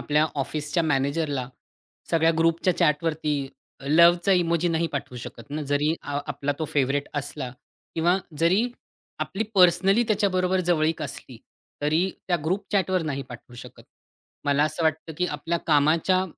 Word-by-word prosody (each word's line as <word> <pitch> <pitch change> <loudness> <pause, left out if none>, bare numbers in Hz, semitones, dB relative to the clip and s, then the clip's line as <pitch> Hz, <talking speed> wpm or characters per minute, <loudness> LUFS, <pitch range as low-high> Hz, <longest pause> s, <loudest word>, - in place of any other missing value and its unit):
आपल्या 150 +1 +2 0.2
ऑफिसच्या 155 +4 -2
मॅनेजरला 140 -2 0 0.6
सगळ्या 165 0 +4
ग्रुपच्या 165 +2 +2
चॅटवरती 150 0 +1 0.6
लव्हचा 170 +4 +5
इमोजी 170 -1 +2
नाही 165 0 +1
पाठवू 140 -4 -5
शकत 125 +4 -10
ना, 150 +1 -3
जरी 145 +3 +1
आ 145 0 -3
आपला 145 +1 -2
तो 160 - -1
फेव्हरेट 145 -1 0
असला 145 -2 -4 0.4
किंवा 175 +3 +2 0.2
जरी 190 +9 +2 0.5
आपली 205 +3 -2
पर्सनली 195 +4 +5
त्याच्याबरोबर 190 -3 +1
जवळीक 160 -1 +1
असली, 125 - -7 0.5
तरी 160 +6 +2 0.2
त्या 175 - +3
ग्रुप 190 +5 -1
चॅटवर 185 -3 +1
नाही 140 -3 -3
पाठवू 120 0 -11
शकत. - - -12 0.6
मला 145 +1 +2
असं 160 +2 -2
वाटतं, 160 +1 -1
की 180 - +1
आपल्या 165 +2 -2
कामाच्या 165 +5 +3
160 Hz, 140 wpm, -25 LUFS, 145-175 Hz, 0.6 s, लव्हचा